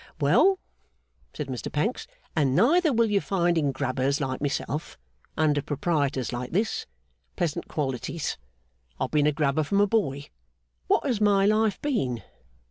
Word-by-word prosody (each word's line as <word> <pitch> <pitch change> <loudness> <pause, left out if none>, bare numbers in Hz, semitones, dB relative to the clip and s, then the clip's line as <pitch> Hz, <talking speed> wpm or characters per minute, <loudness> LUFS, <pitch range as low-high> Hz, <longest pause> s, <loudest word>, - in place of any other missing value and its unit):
'Well,' 385 0 +4 0.7
said 150 - -5
Mr 130 -3 -5
Pancks, 205 +12 -1 0.3
'and 140 -5 +2
neither 310 - +4
will 230 -3 +2
you 200 -1 +3
find 175 -3 +1
in 145 -4 +1
Grubbers 130 +2 -1
like 130 -2 -3
myself, 145 +1 -3 0.4
under 150 -2 +2
Proprietors 140 -4 -1
like 125 +3 -5
this, 215 +5 0 0.5
pleasant 170 -4 -2
qualities. 145 +2 -3 0.6
I've - - -2
been 150 -1 +3
a - - +4
Grubber 145 +1 +1
from 200 +7 0
a 205 - +6
boy. 145 -10 -1 0.6
What - - +2
has 240 -7 0
my 200 -2 +4
life 215 0 +2
been? 130 - -1
155 Hz, 145 wpm, -26 LUFS, 140-205 Hz, 0.7 s, a